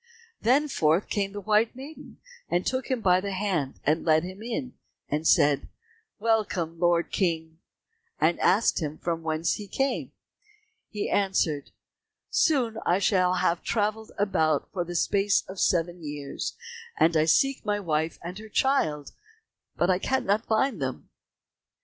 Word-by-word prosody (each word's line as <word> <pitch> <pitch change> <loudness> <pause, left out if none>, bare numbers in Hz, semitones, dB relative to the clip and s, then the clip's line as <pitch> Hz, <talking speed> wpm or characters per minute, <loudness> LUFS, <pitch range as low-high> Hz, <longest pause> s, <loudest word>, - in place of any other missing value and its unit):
Then 275 +6 +3
forth 165 - +1
came 200 -1 -1
the 205 - -6
white 215 +3 +2
maiden, 280 +5 -11 0.5
took 260 -1 -1
him 255 -3 0
by 185 -2 +4
the 200 0 -4
hand, 185 -8 -2
led 155 +1 +3
him 185 +3 -8
in, 245 +3 -4 0.4
and 155 +2 -1
said, 145 -1 +4 0.5
"Welcome, 205 -7 0
Lord 175 -1 +2
King," 160 -3 -1 0.6
and 160 +3 +2
asked 200 0 +3
him 155 0 -4
from 165 -1 -3
whence 160 +1 0
he 205 - -8
came. 270 +7 -1 0.8
He 210 -1 -3
answered, 175 -7 0 0.6
"Soon 250 -8 +2 0.2
shall 185 -2 +2
I - - -1
have 170 0 +1
travelled 215 0 -1
about 160 -7 +1
for 180 - -1
the 175 +1 -7
space 200 +3 +2
of 190 0 -8
seven 175 0 +1
years, 145 -2 -5 0.4
and 165 +1 +3
I 155 0 +4
seek 270 - +2
my 205 -1 0
wife 160 -3 -1
and 180 +4 -6
her 220 0 -11
child, 160 - +1 0.6
but 180 +1 +1
cannot 220 -4 0
find 220 - +1
them." 130 -1 -4
185 Hz, 145 wpm, -27 LUFS, 160-215 Hz, 0.8 s, by